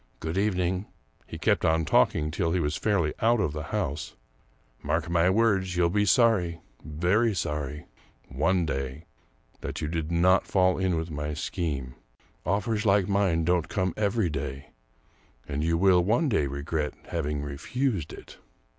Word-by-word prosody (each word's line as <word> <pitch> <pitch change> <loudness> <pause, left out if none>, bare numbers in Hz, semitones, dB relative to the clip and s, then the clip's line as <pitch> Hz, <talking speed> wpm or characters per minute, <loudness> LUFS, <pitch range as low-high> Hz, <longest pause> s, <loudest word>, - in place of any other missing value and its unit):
" - - -38
Good 80 +1 -4
evening 95 -1 0
" - - -40
— - - -35
he - - -7
kept - - +1
on 80 0 +2
talking 75 0 +2
till 85 -1 -1
he 90 - +1
was 75 -2 -1
fairly 85 -8 +1
out 115 +1 +3
of 90 -8 0
the 75 -1 -5
house 75 +4 -3 0.2
— - - -37
" - - -37
mark 80 -1 -1
my 85 +1 +3
words, 95 -3 +2
you'll 85 -1 +3
be 105 +2 +2
sorry 95 -8 +3 0.2
— - - -28
very 90 +9 +1
sorry 75 -2 -3 0.2
— - - -35
one 85 +7 +1
day 70 +1 -4 0.5
that - - -5
you 75 - -2
did 80 0 -3
not 90 +3 +3
fall 95 -1 +2
in 95 -2 +1
with 80 +1 -3
my 75 0 -3
scheme. 70 -6 -3 0.5
Offers 105 +1 0
like 100 -3 +3
mine 95 -5 +1
don't 90 -1 +1
come 95 -3 -1
every 105 -4 0
day, 70 0 -5 0.8
and 70 +1 -2
you 85 +1 +1
will 90 -1 +4
one 120 - +2
day 90 - +1
regret 75 +2 -3
having 75 -3 -2
refused 95 - -2
it." - - -12
85 Hz, 180 wpm, -27 LUFS, 75-95 Hz, 0.8 s, will